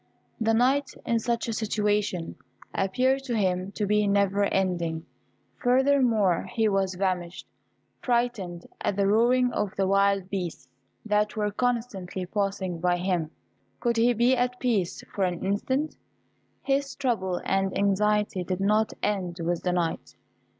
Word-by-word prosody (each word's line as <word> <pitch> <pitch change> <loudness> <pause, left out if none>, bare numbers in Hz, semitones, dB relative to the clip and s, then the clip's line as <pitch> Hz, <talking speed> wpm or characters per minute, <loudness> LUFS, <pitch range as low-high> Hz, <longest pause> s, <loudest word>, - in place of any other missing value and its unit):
The 225 0 +2
night, 265 +4 +2
in 230 -1 +1
such 235 +1 -1
a 230 - -2
situation, 210 -5 -1 0.4
appeared 255 +8 +1
to 240 -3 -1
him 185 -1 0
to 210 - -1
be 210 +1 +2
never 200 0 +2
ending; 175 -5 -1 0.6
furthermore, 245 -7 +3
he 225 -2 +3
was 195 -2 0
famished, 180 -2 -2 0.6
frightened 235 -8 -1 0.2
at - - 0
the 200 0 +2
roaring 240 +4 +3
of 205 -2 -2
the 195 - +2
wild 195 0 +2
beasts, 180 -4 -4 0.4
that 210 +1 +1
were 210 -1 0
constantly 210 -6 -2
passing 195 -2 -2
by 175 +1 +2
him. 175 -3 -1 0.5
Could 235 -1 0
he 240 +2 +4
be 240 +3 +3
at 250 0 -1
peace 215 -8 0
for 200 - 0
an 180 -1 -1
instant? 260 +10 -1 0.7
His 275 0 0
trouble 210 -10 -1
and 195 0 0
anxiety 205 -1 +1
did 185 +1 -3
not 210 +2 +2
end 185 -4 -1
with 170 0 -1
the 180 - 0
night. 175 -2 -2
205 Hz, 145 wpm, -26 LUFS, 185-235 Hz, 0.7 s, he